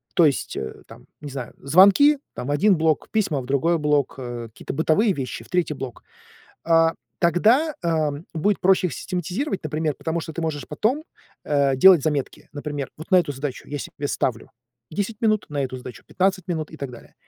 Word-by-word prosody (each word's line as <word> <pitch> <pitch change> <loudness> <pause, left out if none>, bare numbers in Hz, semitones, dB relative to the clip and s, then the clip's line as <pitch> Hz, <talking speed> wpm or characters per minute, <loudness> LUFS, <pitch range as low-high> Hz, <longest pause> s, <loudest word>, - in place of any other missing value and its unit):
то 175 - +6
есть, 140 -4 0
э, 65 - -6
там, - - -15
не 145 - -7
знаю, 130 -3 -6
звонки, 195 - +6 0.2
там- 125 - -6
в - - -1
1 190 +8 +4
блок, 160 -2 +1
письма- 200 -10 +1
в - - -9
другой 140 +6 +2
блок, 150 -3 +1
э, 120 -2 -6
какие-то 115 - -8
бытовые 165 +8 +2
вещи- 135 -6 -5
в - - -20
3-й 175 -4 0
блок. 135 -2 -7 0.6
А, 165 0 +4 0.2
тогда, 225 - +3
а, 160 -3 +1 0.2
будет 200 +5 +1
проще 185 0 +4
их - - -6
систематизировать, 185 - -3
например, 155 0 -1
потому 165 +3 -3
что 160 0 -7
ты 165 - -5
можешь 150 -3 -3
потом, 245 - 0 0.4
э, 140 -2 +2
делать 175 +2 +7
заметки. 145 -3 -2
Например, 145 -2 -5
вот 155 +6 -11
на 185 - +6
эту 155 -5 0
задачу 135 -1 -5
я 145 - -4
себе 145 +1 -5
ставлю 115 -5 -2 0.4
10 205 +6 -3
минут, 215 -3 +2
на 145 -1 -1
эту 130 -1 -4
задачу 125 -1 -10
15 185 -1 0
минут 160 -3 -3
и 160 - -10
так 140 -2 -5
далее. 120 - -14
155 Hz, 195 wpm, -23 LUFS, 140-185 Hz, 0.6 s, делать